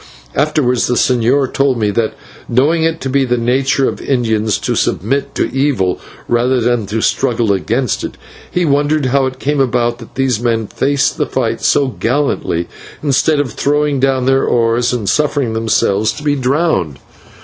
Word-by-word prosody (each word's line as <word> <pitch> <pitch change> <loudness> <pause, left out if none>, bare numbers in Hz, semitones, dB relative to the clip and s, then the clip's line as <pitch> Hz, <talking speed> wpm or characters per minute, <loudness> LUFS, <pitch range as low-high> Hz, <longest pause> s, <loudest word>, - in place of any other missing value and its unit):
Afterwards 135 -4 +1
the 125 - 0
señor 130 +3 +2
told 135 -2 +1
me 105 -2 +1
that, 110 +1 -1 0.3
knowing 145 +7 +2
it 165 0 0
to - - -3
be 135 +1 +1
the 125 -1 0
nature 130 +3 +1
of - - -4
Indians 110 -5 0
to - - -2
submit 140 +6 -1
to - - 0
evil 135 -10 +1 0.3
rather 125 +2 +1
than 120 -3 0
to 110 +2 -2
struggle 115 -5 +1
against 115 +6 -1
it, - - -6 0.3
he 180 -1 0
wondered 145 0 +1
how 135 +1 +2
it 130 0 -6
came 145 +2 -1
about 120 -2 +1
that 115 - -13
these 130 -4 0
men 115 -2 0
faced 135 +5 0
the - - 0
fight 115 -3 -2
so 140 -2 +2
gallantly, 115 - -1 0.4
instead 145 +1 +2
of 130 -6 -2
throwing 145 -1 0
down 130 -1 +1
their 135 0 +3
oars 120 +1 +1
and 120 -5 -3
suffering 145 -2 +1
themselves 110 -2 +1
to 150 - -9
be 145 -1 +1
drowned. 130 - 0
130 Hz, 170 wpm, -15 LUFS, 115-140 Hz, 0.4 s, their